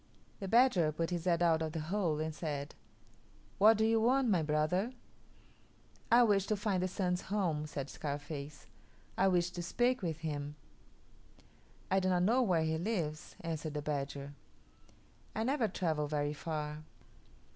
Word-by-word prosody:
The 195 - -4
badger 225 -8 +4
put 165 +3 -2
his 175 -1 -2
head 175 -1 +2
out 165 -1 +3
of 160 -1 -2
the 165 - -2
hole 165 -1 -1
and 155 0 -2
said, 145 -3 -4 0.9
"What 215 +2 +7
do 220 - +3
you 225 0 +3
want, 255 +2 +3
my 185 -5 +3
brother?" 155 +9 0 1.2
"I 240 +1 +7
wish 200 -4 +3
to 215 - +1
find 200 -3 0
the 185 - +1
Sun's 180 -1 -1
home," 170 -7 0
said 140 -2 -5
Scarface. 145 0 -6 0.5
"I 190 - +3
wish 175 -1 +2
to 180 - -5
speak 240 +9 +1
with 165 -3 -3
him." 145 -2 -4 1.4
"I 190 - +4
do 185 0 0
not 180 -1 +2
know 235 +7 +4
where 180 -9 +2
he 160 0 0
lives," 165 -6 -3
answered 160 -2 -4
the 150 - -2
badger. 140 -1 -3 1.0
"I 220 - 0
never 260 -1 +1
travel 160 -7 -1
very 145 0 -1
far. 150 -1 -4
170 Hz, 160 wpm, -33 LUFS, 150-200 Hz, 1.4 s, What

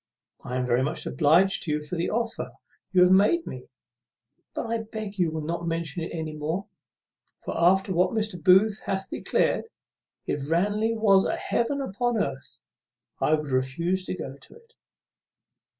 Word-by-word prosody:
I 125 - -3
am 125 - 0
very 125 0 +2
much 150 +5 -2
obliged 175 +6 +3
to 155 - -3
you 150 0 -2
for 150 +4 -5
the 170 0 -1
offer 230 +1 -2 0.4
you 180 -2 +6
have 180 - +5
made 210 - +4
me; - - -8 0.9
but - - -2
I 230 0 -1
beg 215 -2 -6
you 175 -2 +3
will 155 -1 -4
not 170 +1 -3
mention 165 -1 -2
it 165 - -4
any 160 -2 -4
more; 160 +6 -3 0.8
for, - - -4
after 190 +2 +3
what 180 +1 +3
Mr. 215 -6 -3
Booth 195 +3 +5
hath 190 0 -2
declared, - - 0 0.6
if 145 0 -3
Ranelagh 210 +7 +1
was 195 -3 +5
a - - 0
heaven 280 +4 -1
upon 240 0 -1
earth, 140 -9 -4 0.6
I 155 - +3
would 150 -2 -5
refuse 165 +9 0
to - - -3
go 135 -5 -7
to - - -15
it." 465 0 -20
180 Hz, 170 wpm, -26 LUFS, 155-210 Hz, 0.9 s, you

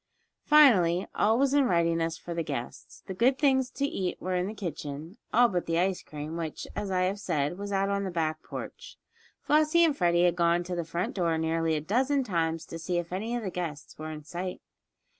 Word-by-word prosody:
Finally 195 - +5
all 220 +2 +3
was 275 +1 +2
in 285 -2 +4
readiness 165 -2 +1
for 175 - -7
the 170 - -1
guests. 140 -6 -6
The 190 - -5
good 245 +7 +3
things 265 -3 +2
to 280 - -1
eat 190 -10 -3
were 185 +1 -3
in 180 +1 0
the 215 - -6
kitchen, 160 - -6
all 245 +2 +6
but 180 -6 -2
the 165 0 0
ice 185 +1 +1
cream, 150 +2 -7
which, 160 -2 -5
as 205 - -3
I 185 -1 +1
have 190 +3 0
said, 165 -1 -1
was 200 0 -5
out 195 0 +1
on 200 0 0
the 190 - -2
back 155 -3 -1
porch. - - -8 0.5
Flossie 310 +3 +4
and 310 -4 +1
Freddie 175 -3 +3
had 175 -1 +3
gone 170 0 +2
to 180 0 -4
the 170 - -2
front 170 +2 -3
door 170 -4 0
nearly 160 0 0
a 150 - -1
dozen 260 - +1
times 165 -6 -1
to 165 - -8
see 175 +2 -2
if 175 0 -3
any 220 +6 -2
of 240 - -3
the 190 - -3
guests 165 -5 -5
were 155 0 -5
in 155 -1 -7
sight. 180 +3 -5
180 Hz, 220 wpm, -28 LUFS, 165-210 Hz, 0.5 s, all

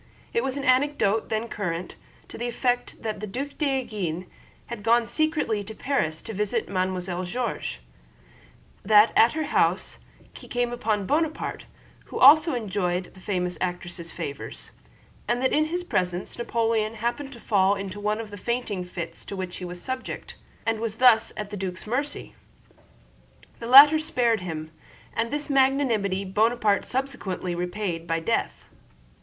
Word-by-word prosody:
It 465 - +1
was 270 +1 -2
an 280 - -3
anecdote, 255 -5 +2
then 220 +1 -1
current, 175 -5 -4 0.3
to - - -9
the 240 - -3
effect 245 +1 -1
that 215 -2 -3
the 215 - -5
Duc 265 +8 -4
d'Enghien 215 - -1 0.4
had 235 -3 -7
gone 230 +2 +3
secretly 305 -7 0
to 220 +2 -9
Paris 160 - -1
to 225 - -6
visit 210 +3 -1
Mademoiselle 185 -1 -2
George; 195 - -3 1.0
that 210 +2 +6
at 230 - +6
her 315 0 -1
house - - +1 0.3
he - - -12
came 245 0 -1
upon 215 -4 -1
Bonaparte, 315 - -1 0.4
who - - -7
also 310 +3 +7
enjoyed 185 -5 -2
the 190 - -15
famous 180 -2 -2
actress' 175 -1 -4
favors, 150 -5 -6 0.6
and 240 +1 +1
that 260 +1 +1
in 305 +1 +3
his 350 +3 -3
presence 180 - -2
Napoleon 225 -2 0
happened 240 +5 -3
to 235 - -11
fall 200 -3 +3
into 195 0 -6
one 210 +1 0
of 220 -2 -6
the 205 - -7
fainting 220 -3 -2
fits 170 -2 -7
to 200 - -6
which 185 -2 -5
he 180 - -6
was 175 0 -6
subject, 260 +7 -5 0.3
and 225 -1 0
was 225 -2 -3
thus 240 -1 +5
at 210 -1 -5
the 205 - -4
duc's 185 -1 -4
mercy. 275 +6 -3 1.3
The 230 - -6
latter 290 +5 +10
spared 245 -8 +1
him, 160 -3 -6 0.4
and 230 0 0
this 295 +3 -2
magnanimity 260 -8 +2
Bonaparte 215 +1 +2
subsequently 205 -9 -2
repaid 175 -1 -3
by 165 0 0
death. 165 - -1
215 Hz, 155 wpm, -26 LUFS, 185-250 Hz, 1.3 s, latter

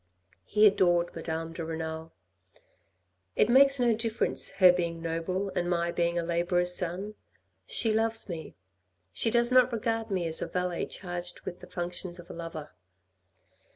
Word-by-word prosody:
He 210 +1 +4
adored 175 -4 +3
Madame 165 0 -4
de 165 - -5
Renal. 160 0 -5 0.6
" 90 0 -45
It 210 - +3
makes 275 +2 +6
no 240 -2 +3
difference 225 0 0
her 185 -2 +7
being 170 -2 -2
noble, 165 +4 -2
and 175 -1 -1
my 170 -1 0
being 170 0 0
a 170 - 0
labourer's 175 +1 +1
son. 185 +4 -2 0.5
She 225 -2 +1
loves 225 +1 +1
me.... 165 -4 -7 0.6
she 225 - +1
does 240 +1 +3
not 255 0 +5
regard 225 0 -2
me 185 -3 -1
as 160 -1 +1
a - - -2
valet 180 -1 -2
charged 175 -1 -6
with 180 - -7
the 180 - -12
functions 175 0 -5
of 175 -1 -11
a - - -8
lovei." 165 -2 -6
175 Hz, 160 wpm, -29 LUFS, 165-210 Hz, 0.6 s, her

